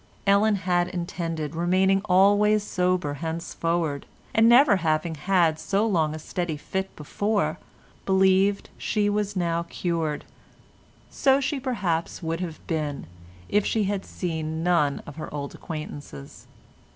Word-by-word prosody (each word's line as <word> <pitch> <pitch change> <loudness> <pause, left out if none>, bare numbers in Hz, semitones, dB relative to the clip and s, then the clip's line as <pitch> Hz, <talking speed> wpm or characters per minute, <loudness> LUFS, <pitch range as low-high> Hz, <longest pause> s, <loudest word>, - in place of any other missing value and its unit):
Ellen 205 +2 +4
had 180 -2 +1
intended 170 -4 -4
remaining 185 +3 +2
always 205 +2 +4
sober 180 -6 0
henceforward, 165 -2 -2 0.3
and 225 +1 +5
never 245 -3 +6
having 160 -1 0
had 165 -1 +2
so 195 +7 0
long 160 -8 +1
a - - -5
steady 160 0 -3
fit 190 +5 -4
before, 195 +1 -1 0.5
believed 190 +1 +3
she 205 -1 0
was 205 -1 -1
now 170 -2 0
cured. 165 -4 -2 0.9
So 270 -1 +3
she 280 +1 -1
perhaps 195 -11 -2
would 165 +1 -2
have 170 -3 -6
been 150 -4 -3 0.4
if 205 0 +2
she 220 +1 0
had 200 0 -1
seen 160 -2 -4
none 160 -5 +2
of 145 - -10
her 155 - -6
old 140 -1 -5
acquaintances. 145 - -8
180 Hz, 130 wpm, -25 LUFS, 160-200 Hz, 0.9 s, never